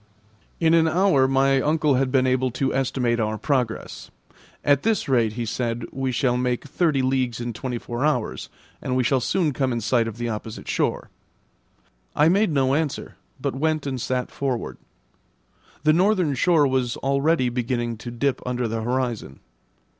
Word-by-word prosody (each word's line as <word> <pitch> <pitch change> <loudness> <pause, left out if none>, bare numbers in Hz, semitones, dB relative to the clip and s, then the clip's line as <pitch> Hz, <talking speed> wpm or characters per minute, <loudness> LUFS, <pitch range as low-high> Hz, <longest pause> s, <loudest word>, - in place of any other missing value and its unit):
In 165 -1 +3
an 165 -1 +5
hour 160 -5 +3
my 135 0 +3
uncle 150 0 +2
had 130 0 +1
been 130 -1 +3
able 130 0 +1
to 130 +2 -1
estimate 125 -2 0
our 110 -1 -1
progress. 125 -3 -2 0.6
At 140 -1 +4
this 225 -1 0
rate, 120 -5 +2
he 120 +1 -3
said, 115 +1 -2
we 135 -1 -2
shall 125 0 +1
make 125 -1 -1
thirty 145 -2 +1
leagues 130 -3 0
in 120 0 -4
twenty 125 +2 -4
four 120 +2 -4
hours, 145 -7 -1 0.3
and 130 - -2
we 130 - +2
shall 130 +2 +2
soon 160 +2 0
come 130 0 0
in 120 - -1
sight 115 +1 +1
of 115 -1 -6
the 120 0 -3
opposite 110 0 -6
shore. - - -1 1.0
I 150 +2 +5
made 200 +4 +3
no 135 -3 +2
answer, 150 -1 -2 0.2
but - - -2
went 155 +2 -1
and 130 -3 -3
sat 125 0 -2
forward. 130 -4 -3 1.0
The 155 0 +5
northern 180 -3 +2
shore 155 +2 +3
was 130 -3 0
already 140 0 +1
beginning 120 -1 -2
to 120 - -8
dip 125 +3 -1
under 125 -1 -2
the 115 0 -3
horizon. 120 - -2
130 Hz, 170 wpm, -23 LUFS, 120-145 Hz, 1.0 s, an